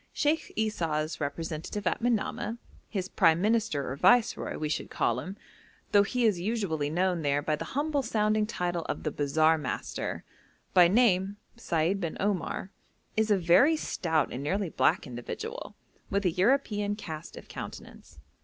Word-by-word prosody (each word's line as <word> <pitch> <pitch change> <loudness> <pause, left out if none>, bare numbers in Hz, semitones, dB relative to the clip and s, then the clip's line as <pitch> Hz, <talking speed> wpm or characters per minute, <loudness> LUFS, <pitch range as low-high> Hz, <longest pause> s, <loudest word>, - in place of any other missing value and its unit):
Sheikh 305 +2 0
Esau's 165 -8 -1
representative 160 +6 -4
at - - 0
Manamah 230 -1 -1 0.3
his 190 -4 -3
prime 165 -3 +3
minister 210 - +1
or - - -3
viceroy, 240 - +3
we 155 - -2
should 150 - -3
call - - 0
him, 190 +2 -7 0.5
though 205 - +6
he 240 +4 0
is 205 -6 +3
usually 180 -7 -1
known 180 +1 +1
there 145 -1 +1
by 155 0 +1
the 150 - -7
humble 290 -1 +1
sounding 215 -3 +1
title 175 -5 -2
of - - -3
the 155 - -1
'bazaar 155 +3 +2
master,' 130 -4 -4 0.5
by 180 -2 +7
name 195 -2 +3 0.2
Seid 175 -4 0
bin 165 -3 -3
Omar, 195 -1 -2 0.4
is 220 0 +2
a 205 - +4
very 185 - +5
stout 160 - -1
and 125 - -4
nearly 185 +6 -1
black - - +2
individual, 120 -3 -6 0.3
with 200 0 0
a 180 - +3
European 205 +1 +1
cast 160 -6 -8
of - - -11
countenance. - - -9
185 Hz, 155 wpm, -29 LUFS, 160-215 Hz, 0.5 s, by